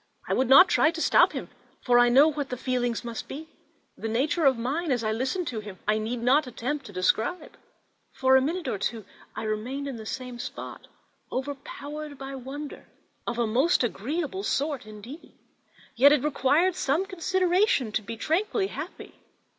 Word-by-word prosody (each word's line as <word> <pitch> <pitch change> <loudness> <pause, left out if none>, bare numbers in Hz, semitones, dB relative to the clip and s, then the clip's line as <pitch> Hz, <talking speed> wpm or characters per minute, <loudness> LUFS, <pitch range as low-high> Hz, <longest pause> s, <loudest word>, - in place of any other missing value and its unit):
I - - 0
would 260 -1 +1
not 275 +8 +9
try 310 - +4
to 330 0 -5
stop - - +4
him, - - -5 0.3
for 245 -1 +5
I 245 0 +6
knew 275 +6 +6
what 285 -2 -4
his 250 - -5
feelings 245 -3 -1
must 235 -1 -6
be. 315 +3 -8 0.5
The 225 - -5
nature 280 +8 +1
of 265 -3 +5
mine, 285 +7 -2
as 245 -3 0
I 215 - 0
listened 260 +11 -1
to 230 - -4
him, 205 -3 -9
I 215 +1 +2
need 230 +2 -3
not 270 +4 +4
attempt 255 +3 -4
to - - -10
describe; 220 - 0 0.6
for 265 0 +3
a 265 - +6
minute 330 +5 -2
or 200 - -2
two 220 0 -3 0.3
I - - -4
remained 235 +6 -3
in 265 -4 -5
the 220 -1 -8
same 250 -1 -6
spot, - - -7 0.4
overpowered 285 +2 -6
by 270 0 -7
wonder 270 +3 -7 0.4
of 235 - -2
a 235 - +2
most 260 +9 +2
agreeable 295 - -2
sort 285 - -1
indeed; 220 +9 -11 0.6
yet 275 +5 +7
it 295 -3 +3
required 300 +5 +2
some 330 +1 0
consideration 370 - +1
to 215 - 0
be 225 +2 -7
tranquilly 385 - 0
happy. - - -8
265 Hz, 180 wpm, -27 LUFS, 235-305 Hz, 0.6 s, not